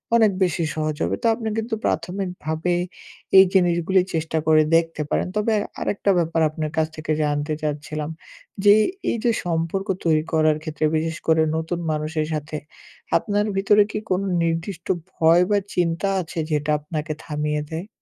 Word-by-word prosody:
অনেক 220 -3 +5
বেশি 175 -2 0
সহজ 155 -1 -1
হবে। 85 +3 0
তো - - +3
আপনি 225 -1 -5
কিন্তু 225 +1 -1
প্রাথমিকভাবে 175 -1 -2 0.6
এই 190 - +10
জিনিসগুলি 180 0 +3
চেষ্টা 160 0 -1
করে 155 -1 +6
দেখতে 165 -1 +1
পারেন। - - 0
তবে 215 +1 +1 0.3
আরেকটা 200 0 +1
ব্যাপার 165 -1 0
আপনার 155 0 -4
কাছ 160 0 +2
থেকে 155 0 -4
জানতে 145 +1 -1
চাচ্ছিলাম, 150 0 -3 0.6
যে 205 - +9 0.4
এই - - -1
যে 240 - +3
সম্পর্ক 170 +3 -1 0.2
তৈরি 155 -2 +3
করার 155 -1 +3
ক্ষেত্রে 155 -1 -2
বিশেষ 160 0 -1
করে 160 0 +4 0.2
নতুন 165 +2 -3
মানুষের 155 +1 -1
সাথে, 150 0 -4 0.6
আপনার 205 -1 0
ভিতরে 205 +2 +5
কি - - -2
কোনো 185 +2 +1 0.2
নির্দিষ্ট 165 +2 -3 0.3
ভয় 165 +2 +5
বা 205 - +4 0.2
চিন্তা 170 +1 +1
আছে? 165 -1 -6
যেটা 150 0 0
আপনাকে 155 +1 -4
থামিয়ে 150 -1 -2
দেয়? 165 +5 -4
165 Hz, 155 wpm, -23 LUFS, 155-185 Hz, 0.6 s, এই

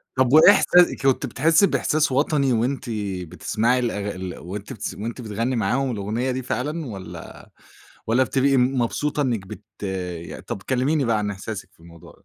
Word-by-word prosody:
طّب 130 0 +2
وإيه 155 +5 +9
إحسا 180 -3 +4
كنتِ 135 0 +2
بتحسّي 160 - +3
بإحساس 155 -5 +1
وطني 140 0 +2
وأنتِ 125 +4 0 0.4
بتسمعي 115 +8 0
الأغ 105 -4 -2
ال 95 -1 -6
وأنتِ 100 +4 -7
بتس 105 - -5
وأنتِ 115 +4 -6
بتغنّي 115 +3 -2
معاهم 130 +3 0
الأغنية 110 +4 -2
دي 130 +1 -3
فعلًا 150 +6 -3
والّا 95 -7 -9 0.7
والّا 120 +4 +3
بتبقي 135 +3 +2
م 130 +1 +2
مبسوطة 150 +5 -1
إنِّك 115 -8 -2
بت 95 - -9 0.6
ي - - -8
طّب 100 - -6
كلِّميني 135 +3 +1
بقى 115 -2 +1
عن 105 -1 -2
إحساسِك 105 +1 -6
في - - -28
الموضوع 85 -1 -15
ده. - - -29
125 Hz, 170 wpm, -23 LUFS, 105-135 Hz, 0.7 s, وإيه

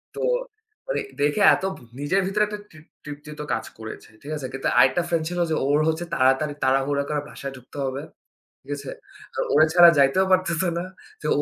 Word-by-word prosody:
তো - - -6 0.7
ওরে - - 0 0.2
দেখে 145 +8 +2
এত - - -7
ভ - - -13 0.2
নিজের 150 +8 +1
ভিতরে 210 +2 +1
একটা 210 0 -6
তৃপ 155 0 -16 0.2
তৃপ্তিতো 150 0 -8
কাজ - - -2
করেছে। 110 0 -9
ঠিক 145 - -8
আছে? 135 -3 -5
কিন্তু 135 - -2
আরেকটা 130 +6 +5
ফ্রেন্ড 170 -2 0
ছিল 175 0 -3
যে 160 - +1
ওর 145 +1 +3
হচ্ছে 160 +2 -1
তাড়াতাড়ি 135 +1 +2
তাড়াহুড়া 135 +2 +1
করে 150 -1 -1
বাসায় 140 -2 -7
ঢুকতে 130 +3 -14
হবে। 135 +1 -3 0.6
ঠিক - - -11
আছে? 140 -2 -7 0.4
তো - - -5
ওরে 155 +2 +6
ছাড়া 175 -1 +9
যাইতেও 140 +7 +4
পারতেছে 185 -1 +2
না। 175 - -4 0.4
যে 150 - -3
150 Hz, 190 wpm, -24 LUFS, 135-175 Hz, 0.7 s, ছাড়া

